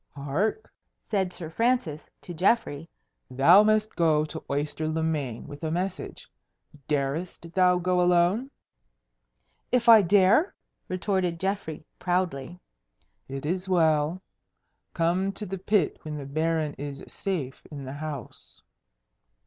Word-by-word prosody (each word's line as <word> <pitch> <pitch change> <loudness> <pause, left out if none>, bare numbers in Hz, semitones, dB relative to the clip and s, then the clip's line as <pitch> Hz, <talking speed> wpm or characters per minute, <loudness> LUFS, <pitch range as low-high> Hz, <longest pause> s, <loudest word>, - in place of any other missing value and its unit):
"Hark!" 150 - -1 0.4
said 190 -4 +1
Sir 165 -3 -7
Francis 225 -8 0
to 175 - -8
Geoffrey. 170 -4 +1 0.4
"Thou 140 +10 +7
must 215 0 +2
go 155 -3 +3
to 160 +1 -8
Oyster 150 +2 -2
le 160 +1 -1
Main 145 -8 -2
with 145 +2 -10
a 160 - -1
message. 180 +3 -4 0.6
Darest 155 +4 -2
thou 180 -1 +4
go 180 0 +1
alone?" 180 +8 +3 1.2
"If 250 -1 +2
I 225 -2 +10
dare?" 200 - +4 0.3
retorted 185 -2 -1
Geoffrey, 190 -5 -3
proudly. 175 -3 -1 0.7
"It 135 +1 -6
is 185 +4 -2
well. 160 0 +2 0.7
Come 175 +4 +1
to 210 - -6
the 195 0 -5
pit 190 -3 +1
when 150 -1 -6
the 140 - -6
Baron 155 +1 -1
is 140 -1 -6
safe 155 -10 -4
in 140 -3 -8
the 130 - -6
house." 145 -4 -8
170 Hz, 125 wpm, -27 LUFS, 150-190 Hz, 1.2 s, I